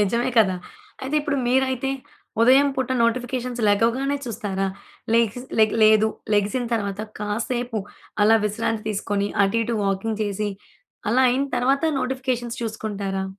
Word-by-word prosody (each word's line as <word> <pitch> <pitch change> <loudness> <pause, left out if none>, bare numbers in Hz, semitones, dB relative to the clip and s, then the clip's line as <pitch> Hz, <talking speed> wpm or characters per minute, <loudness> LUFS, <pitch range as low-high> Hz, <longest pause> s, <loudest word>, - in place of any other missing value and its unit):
నిజమే 235 +5 +1
కదా! 190 -4 +4 0.5
అయితే 270 +3 -3
ఇప్పుడు 290 -1 -1
మీరైతే 260 +1 +1 0.5
ఉదయం 265 +4 +6
పూట 260 -1 -1
నోటిఫికేషన్స్ 245 +1 -1
లెగవగానే 235 +7 +2
చూస్తారా? 195 -4 -2 0.5
లెగిసిన 235 +2 +1
లే 220 - +7 0.2
లేదు 215 0 +6 0.3
లెగిసిన 205 +5 +1
తరువాత, 205 -3 -1 0.2
కాసేపు 230 +2 -2 0.4
అలా 220 +2 +6
విశ్రాంతి 215 +1 -1
తీసుకొని, 205 0 -1 0.2
అటు 195 +4 +1
ఇటు 230 0 -2
వాకింగ్ 205 +3 -1
చేసి, 205 0 -2 0.6
అలా 255 +3 +4
అయిన 270 +3 +1
తరువాత 270 +4 +2 0.2
నోటిఫికేషన్స్ 255 -2 -2
చూసుకుంటారా? 200 -3 -3
230 Hz, 125 wpm, -23 LUFS, 205-255 Hz, 0.6 s, లే